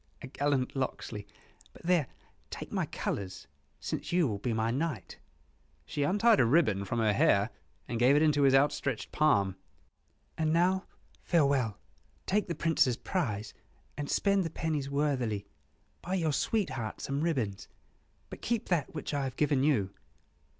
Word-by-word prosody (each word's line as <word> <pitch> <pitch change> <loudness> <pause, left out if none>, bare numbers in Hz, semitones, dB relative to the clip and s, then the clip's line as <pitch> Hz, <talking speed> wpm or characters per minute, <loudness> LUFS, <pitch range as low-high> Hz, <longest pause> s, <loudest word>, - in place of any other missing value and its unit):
"Oh, 75 0 -38
a - - -5
gallant 140 -2 0
Locksley! 115 -5 -4 0.5
But - - -16
there, 170 -5 +2 0.4
take - - -7
my - - -1
colors, 95 -1 -4 0.3
since - - -4
you 175 -3 +3
will 105 -4 -3
be 120 - -2
my 110 0 0
knight." 155 +6 -3 0.7
She 145 - -4
untied 205 +9 +4
a - - +5
ribbon 115 - +3
from 120 - -3
her 110 -2 +3
hair, 100 +2 +3 0.4
and 115 - -3
gave 125 +4 +5
it 150 - +4
into 150 -2 +3
his 135 -1 +5
outstretched 135 -3 +1
palm. 100 -12 +2 0.8
"And 155 -1 +2
now, 185 +3 +2 0.4
farewell; 140 - +2 0.5
take 205 +1 +1
the 170 - -3
Prince's 145 -7 +2
prize, 110 - -2 0.4
and 145 -1 -4
spend 200 -1 +2
the 165 - -2
pennies 155 -3 -2
worthily. 130 -8 0 0.6
Buy 185 +2 -2
your 160 -5 +1
sweetheart 140 - -1
some 140 +1 -2
ribbons, 125 -12 -1 0.6
but - - -8
keep 235 -2 -2
that 165 -4 0
which 155 - -4
I 140 -1 0
have 130 - -5
given 145 -3 +2
you." 115 -10 +2
140 Hz, 155 wpm, -30 LUFS, 115-165 Hz, 0.8 s, a